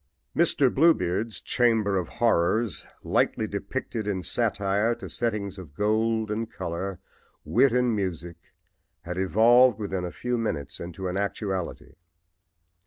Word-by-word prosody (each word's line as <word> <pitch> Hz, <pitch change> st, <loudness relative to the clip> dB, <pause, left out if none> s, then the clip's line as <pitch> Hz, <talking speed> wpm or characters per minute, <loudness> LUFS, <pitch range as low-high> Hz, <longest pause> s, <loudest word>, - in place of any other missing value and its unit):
"Mr. 145 Hz, -6 st, +3 dB
Bluebeard's" 115 Hz, -, +2 dB
chamber 110 Hz, -5 st, +2 dB
of 90 Hz, -3 st, -1 dB
horrors, 110 Hz, -2 st, +1 dB, 0.2 s
lightly 110 Hz, -, +1 dB
depicted 105 Hz, +2 st, -4 dB
in 95 Hz, -3 st, -2 dB
satire 105 Hz, +2 st, +1 dB
to -, -, -9 dB
settings 105 Hz, -5 st, -2 dB
of 75 Hz, -6 st, -11 dB
gold 110 Hz, +1 st, +1 dB
and 110 Hz, +1 st, -3 dB
color, 90 Hz, +2 st, -4 dB, 0.5 s
wit 130 Hz, +4 st, +4 dB
and 125 Hz, -1 st, +2 dB
music, 85 Hz, -4 st, -3 dB, 0.6 s
had 90 Hz, +1 st, -5 dB
evolved 115 Hz, +5 st, +5 dB
within 95 Hz, -4 st, -3 dB
a 90 Hz, -, -4 dB
few 125 Hz, -1 st, -2 dB
minutes 75 Hz, -11 st, -3 dB
into 90 Hz, +2 st, -5 dB
an 90 Hz, +1 st, -2 dB
actuality. 95 Hz, -5 st, -3 dB
105 Hz, 125 wpm, -26 LUFS, 95-115 Hz, 0.6 s, evolved